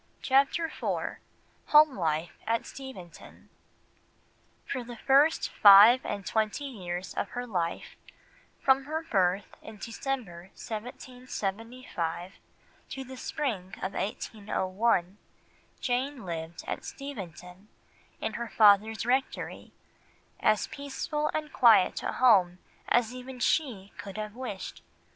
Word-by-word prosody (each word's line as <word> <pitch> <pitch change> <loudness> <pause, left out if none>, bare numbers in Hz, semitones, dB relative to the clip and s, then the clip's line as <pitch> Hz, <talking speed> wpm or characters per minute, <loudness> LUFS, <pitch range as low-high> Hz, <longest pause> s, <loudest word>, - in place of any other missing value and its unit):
CHAPTER 275 +5 +3
IV - - -3 0.5
HOME 300 -2 +6
LIFE 160 -2 -1 0.2
AT 230 0 0
STEVENTON 260 -11 -11 1.2
For 255 -3 -4
the 240 0 -9
first 275 +6 +3
five 210 +5 +8
and 200 -1 -4
twenty 220 +6 -1
years 185 -8 -5
of - - -3
her 245 - -2
life, 175 -7 -3 0.6
from 270 0 +3
her 315 +2 -3
birth 190 0 +2 0.2
in 220 -1 -11
December 220 -6 -5
1775 225 -5 -5 0.6
to 270 - -5
the 260 0 -10
spring 220 -9 -3
of 190 - -4
1801, 200 -2 -1 0.6
Jane 255 0 -1
lived 165 -1 -6
at - - -4
Steventon, 190 - -9 0.5
in 220 - -3
her 235 +1 -4
father's 215 +1 +5
rectory, 260 +2 -2 0.7
as 215 -1 +3
peaceful 295 +2 -3
and 305 -1 -4
quiet 220 -6 +5
a - - -3
home 190 -8 +4 0.3
as 240 0 +2
even 255 0 -9
she 240 -9 0
could 200 0 -7
have 215 -1 -5
wished. 240 -7 -6
225 Hz, 110 wpm, -29 LUFS, 190-260 Hz, 1.2 s, five